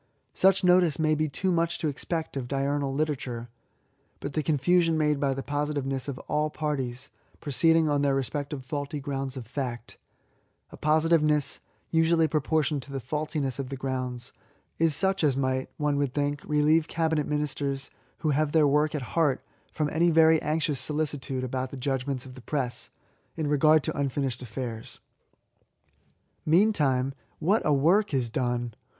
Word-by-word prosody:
Such 190 Hz, 0 st, +4 dB
notice 180 Hz, -4 st, +4 dB
may 155 Hz, -1 st, +2 dB
be 155 Hz, 0 st, 0 dB
too 185 Hz, +7 st, -1 dB
much 170 Hz, -1 st, +1 dB
to 160 Hz, -, -1 dB
expect 160 Hz, +2 st, -3 dB
of 130 Hz, -3 st, -3 dB
diurnal 140 Hz, +1 st, -1 dB
literature; 135 Hz, -5 st, -2 dB, 0.7 s
but 140 Hz, -, -5 dB
the 155 Hz, -, 0 dB
confusion 165 Hz, +3 st, +2 dB
made 150 Hz, -2 st, +2 dB
by 135 Hz, -1 st, +1 dB
the 135 Hz, -, -4 dB
positiveness 145 Hz, -2 st, -2 dB
of 140 Hz, -3 st, -4 dB
all 150 Hz, +1 st, +1 dB
parties, 135 Hz, -5 st, -3 dB, 0.3 s
proceeding 160 Hz, +3 st, +3 dB
on 145 Hz, -1 st, +1 dB
their 140 Hz, -1 st, +2 dB
respective 140 Hz, 0 st, -3 dB
faulty 145 Hz, +2 st, -4 dB
grounds 135 Hz, -1 st, -4 dB
of 125 Hz, -, -6 dB
fact 120 Hz, -1 st, -5 dB, 0.4 s
— -, -, -41 dB
a -, -, -9 dB
posi 155 Hz, +1 st, +2 dB
tiveness 150 Hz, -3 st, +3 dB, 0.3 s
usually 165 Hz, 0 st, +3 dB
proportioned 155 Hz, -1 st, 0 dB
to 140 Hz, -, -11 dB
the 135 Hz, -, -3 dB
faxdtiness 140 Hz, 0 st, -3 dB
of 135 Hz, -2 st, -3 dB
the 135 Hz, -, -5 dB
grounds 130 Hz, -2 st, -4 dB, 0.2 s
— -, -, -40 dB
is 165 Hz, -2 st, +3 dB
such 190 Hz, -2 st, +1 dB
as 140 Hz, -3 st, +3 dB
mighty 130 Hz, -1 st, 0 dB
one 150 Hz, -1 st, 0 dB
would 140 Hz, -3 st, -1 dB
think> 145 Hz, 0 st, -1 dB
relieve 150 Hz, +2 st, +3 dB
Cabinet 160 Hz, -3 st, 0 dB
Ministers 140 Hz, -2 st, -2 dB, 0.3 s
who 155 Hz, -, +3 dB
have 145 Hz, +1 st, +1 dB
their 160 Hz, -2 st, +5 dB
work 150 Hz, +2 st, +2 dB
at 145 Hz, -, -2 dB
hearty 150 Hz, -6 st, +2 dB, 0.3 s
from 155 Hz, -2 st, -1 dB
any 170 Hz, +2 st, +3 dB
very 160 Hz, -1 st, +5 dB
anxious 150 Hz, -2 st, 0 dB
solicitude 145 Hz, -2 st, -2 dB
about 130 Hz, 0 st, -2 dB
the 135 Hz, -, -8 dB
judgments 135 Hz, 0 st, -2 dB
of 130 Hz, -, -10 dB
the 130 Hz, -, -12 dB
press, 125 Hz, -1 st, -3 dB, 0.5 s
in 160 Hz, -, -2 dB
regard 150 Hz, +1 st, +4 dB
to -, -, -3 dB
unfinished 135 Hz, -2 st, -1 dB
affairs. 115 Hz, -1 st, -6 dB, 1.4 s
Meantime, 150 Hz, -8 st, +3 dB, 0.2 s
what 195 Hz, +8 st, +2 dB
a 150 Hz, -, +2 dB
work 165 Hz, +5 st, +3 dB
is 120 Hz, -3 st, 0 dB
done 120 Hz, -1 st, -1 dB
145 Hz, 165 wpm, -27 LUFS, 135-155 Hz, 1.4 s, their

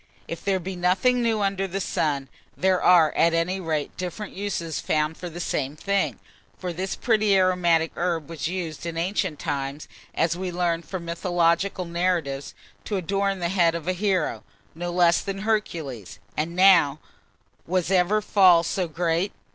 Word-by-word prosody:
If 165 Hz, -, -6 dB
there 195 Hz, -1 st, +1 dB
be 185 Hz, +2 st, -5 dB
nothing 190 Hz, +8 st, +2 dB
new 225 Hz, -2 st, +1 dB
under 195 Hz, -1 st, 0 dB
the 190 Hz, +1 st, -3 dB
sun, 145 Hz, -6 st, -1 dB, 0.3 s
there 185 Hz, 0 st, +2 dB
are, 170 Hz, -4 st, +6 dB
at 165 Hz, 0 st, +3 dB
any 180 Hz, +3 st, 0 dB
rate, 155 Hz, -5 st, -2 dB
different 185 Hz, +3 st, -5 dB
uses 175 Hz, -5 st, -3 dB
found 155 Hz, +1 st, 0 dB
for 180 Hz, -, -7 dB
the 170 Hz, +1 st, -8 dB
same 140 Hz, -4 st, -2 dB
thing; 155 Hz, -, -1 dB, 0.4 s
for 180 Hz, -1 st, -4 dB
this 185 Hz, +3 st, -3 dB
pretty 215 Hz, -4 st, +2 dB
aromatic 175 Hz, -3 st, +3 dB
herb 170 Hz, -3 st, -1 dB
was 160 Hz, -2 st, -4 dB
used 170 Hz, -3 st, -4 dB
in 165 Hz, -1 st, -4 dB
ancient 170 Hz, -3 st, -1 dB
times, 140 Hz, -2 st, -4 dB, 0.3 s
as 165 Hz, 0 st, +1 dB
we 185 Hz, 0 st, -4 dB
learn 175 Hz, -1 st, 0 dB
from 175 Hz, 0 st, -6 dB
mythological 175 Hz, +2 st, 0 dB
narrative, 170 Hz, -5 st, -1 dB, 0.3 s
to 205 Hz, -, -2 dB
adorn 195 Hz, +2 st, 0 dB
the 175 Hz, -2 st, -2 dB
head 170 Hz, -3 st, +3 dB
of 170 Hz, 0 st, -6 dB
a 185 Hz, -, +2 dB
hero, 185 Hz, -3 st, 0 dB, 0.3 s
no 175 Hz, +2 st, -4 dB
less 175 Hz, -1 st, +4 dB
than 195 Hz, -1 st, -5 dB
Hercules; 160 Hz, -, -2 dB, 0.2 s
and 160 Hz, +3 st, -2 dB
now 180 Hz, -6 st, +6 dB, 0.7 s
was 180 Hz, +1 st, 0 dB
ever 190 Hz, +3 st, +3 dB
fall 185 Hz, -5 st, +5 dB
so 180 Hz, +1 st, -1 dB
great? 170 Hz, +3 st, 0 dB
175 Hz, 165 wpm, -25 LUFS, 165-190 Hz, 0.7 s, are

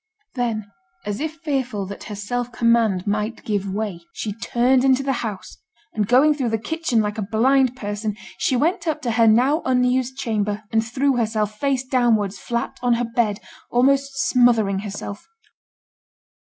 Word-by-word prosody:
Then, 225 Hz, -5 st, -2 dB, 0.3 s
as 205 Hz, +1 st, -3 dB
if 315 Hz, +1 st, -3 dB
fearful 260 Hz, -9 st, -1 dB
that 200 Hz, +1 st, -8 dB
her 210 Hz, -, -6 dB
self 245 Hz, +4 st, -3 dB
command 230 Hz, -6 st, +2 dB
might 210 Hz, +2 st, -2 dB
give 200 Hz, -2 st, -1 dB
way, 205 Hz, -3 st, -3 dB
she 210 Hz, -, -4 dB
turned 245 Hz, +4 st, +2 dB
into 270 Hz, 0 st, +3 dB
the 270 Hz, 0 st, 0 dB
house; 210 Hz, -5 st, -6 dB, 0.4 s
and 210 Hz, -2 st, -1 dB
going 270 Hz, +6 st, +5 dB
through 265 Hz, -5 st, -1 dB
the 225 Hz, -, 0 dB
kitchen 250 Hz, 0 st, 0 dB
like 210 Hz, +1 st, -3 dB
a 205 Hz, 0 st, -5 dB
blind 255 Hz, +3 st, +3 dB
person, 210 Hz, -2 st, -4 dB, 0.2 s
she 260 Hz, -, +1 dB
went 335 Hz, +6 st, 0 dB
up 305 Hz, -1 st, -1 dB
to 240 Hz, -, 0 dB
her 230 Hz, 0 st, +4 dB
now 255 Hz, +9 st, +4 dB
unused 255 Hz, 0 st, +1 dB
chamber, 210 Hz, -4 st, -2 dB
and 225 Hz, 0 st, +2 dB
threw 260 Hz, +3 st, 0 dB
herself, 215 Hz, -2 st, -1 dB
face 275 Hz, -2 st, 0 dB
downwards, 225 Hz, -7 st, +1 dB
flat 235 Hz, +5 st, -3 dB
on 245 Hz, -1 st, +3 dB
her 245 Hz, +1 st, -1 dB
bed, 230 Hz, -3 st, 0 dB, 0.3 s
almost 275 Hz, +2 st, +2 dB
smothering 230 Hz, -6 st, +3 dB
herself. 205 Hz, 0 st, -7 dB
235 Hz, 165 wpm, -22 LUFS, 210-260 Hz, 0.4 s, going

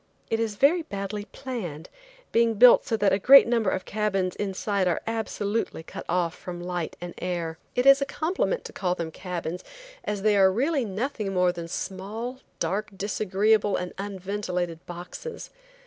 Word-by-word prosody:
It 225 Hz, -, +1 dB
is 225 Hz, -2 st, -1 dB
very 295 Hz, -, +4 dB
badly 205 Hz, -7 st, -5 dB
planned, 195 Hz, -, -6 dB, 0.4 s
being 230 Hz, -1 st, +3 dB
built 245 Hz, +3 st, +7 dB
so 225 Hz, -, +1 dB
that 200 Hz, -3 st, +3 dB
a 195 Hz, -, +2 dB
great 270 Hz, +7 st, +9 dB
number 230 Hz, -4 st, +2 dB
of 185 Hz, -, -2 dB
cabins 195 Hz, -4 st, -1 dB
inside 200 Hz, -1 st, -1 dB
are 175 Hz, -, +1 dB
absolutely 220 Hz, -4 st, -2 dB
cut -, -, -8 dB
off 175 Hz, -1 st, +1 dB
from 175 Hz, -1 st, -7 dB
light 175 Hz, -1 st, -3 dB
and 175 Hz, 0 st, -6 dB
air. 170 Hz, -3 st, -3 dB, 0.2 s
It 250 Hz, -, +1 dB
is 275 Hz, 0 st, +8 dB
a -, -, +2 dB
compliment 360 Hz, -, -1 dB
to -, -, -8 dB
call 180 Hz, -2 st, -1 dB
them 165 Hz, -2 st, -4 dB
cabins 180 Hz, -1 st, -5 dB, 0.4 s
as 205 Hz, -2 st, -3 dB
they 215 Hz, -1 st, +4 dB
are 190 Hz, -1 st, +6 dB
really 270 Hz, -, +1 dB
nothing 215 Hz, 0 st, -3 dB
more 180 Hz, -1 st, +4 dB
than 170 Hz, -1 st, -6 dB
small, 210 Hz, +9 st, -5 dB, 0.2 s
dark, 210 Hz, +2 st, -1 dB
disagreeable, 205 Hz, +1 st, +2 dB
and 180 Hz, 0 st, -4 dB
unventilated 185 Hz, -4 st, -3 dB
boxes. 175 Hz, -, -8 dB
200 Hz, 165 wpm, -26 LUFS, 180-225 Hz, 0.4 s, great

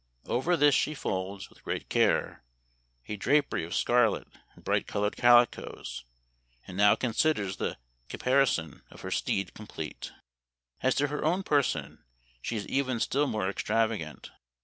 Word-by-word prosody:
Over 170 Hz, +8 st, +1 dB
this 145 Hz, -1 st, +5 dB
she 155 Hz, +3 st, +1 dB
folds, 95 Hz, -4 st, -4 dB
with -, -, -21 dB
great -, -, -4 dB
care, -, -, +1 dB, 0.6 s
a 105 Hz, -, -3 dB
drapery 140 Hz, -, +1 dB
of 85 Hz, -, -4 dB
scarlet 120 Hz, -3 st, +2 dB, 0.3 s
and -, -, -18 dB
bright -, -, 0 dB
colored 105 Hz, +1 st, -1 dB
calicoes, 120 Hz, -, +2 dB, 0.6 s
and 90 Hz, -, -9 dB
now 105 Hz, +1 st, +5 dB
considers 110 Hz, -6 st, 0 dB
the -, -, -3 dB, 0.3 s
caparison 125 Hz, -, +1 dB
of -, -, -14 dB
her -, -, -6 dB
steed 100 Hz, -, -1 dB
complete. 90 Hz, -8 st, -7 dB, 0.4 s
" -, -, -42 dB
As 130 Hz, -, +2 dB
to 145 Hz, 0 st, +1 dB
her 150 Hz, -, -3 dB
own 175 Hz, +5 st, +1 dB
person 145 Hz, -6 st, 0 dB, 0.4 s
she 115 Hz, -, -3 dB
is 100 Hz, -, -5 dB
even 130 Hz, -3 st, 0 dB
still 145 Hz, +5 st, +1 dB
more 105 Hz, -6 st, -1 dB
extravagant. 105 Hz, -5 st, -1 dB
115 Hz, 150 wpm, -29 LUFS, 100-140 Hz, 0.6 s, this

